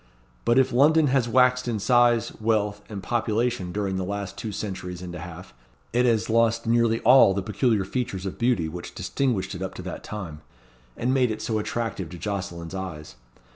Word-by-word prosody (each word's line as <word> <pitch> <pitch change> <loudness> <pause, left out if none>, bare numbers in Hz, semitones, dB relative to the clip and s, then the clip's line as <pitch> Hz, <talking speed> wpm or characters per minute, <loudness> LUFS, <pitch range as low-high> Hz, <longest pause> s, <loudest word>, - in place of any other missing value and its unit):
But 120 +1 +3
if 130 -2 +3
London 150 +3 +5
has 125 -4 +2
waxed 125 +1 +3
in 115 -2 -1
size, 120 +1 +3
wealth, 105 -2 0
and 100 -3 -6
population 115 -4 -1
during 100 -1 -2
the 95 - -2
last 100 +1 -4
two 110 - -5
centuries 90 -3 -5
and 90 -1 -7
a 90 - -6
half, 90 0 -9 0.4
it 125 +1 +3
has 115 -2 +2
lost 115 0 +2
nearly 115 0 +2
all 125 -7 +6
the 100 - -1
peculiar 105 0 +1
features 100 -4 -3
of 95 - -5
beauty 115 -9 +2
which 85 +2 -8
distinguished 100 -1 -1
it 90 - -7
up 95 - -4
to - - -7
that - - -6
time, 85 -8 -7 0.6
and 125 +2 0
made 130 -2 +3
it 110 - -4
so 110 -2 -1
attractive 105 -5 -3
to 90 - -9
Jocelyn's 90 -3 -5
eyes. 90 -5 -6
105 Hz, 190 wpm, -25 LUFS, 95-120 Hz, 0.6 s, all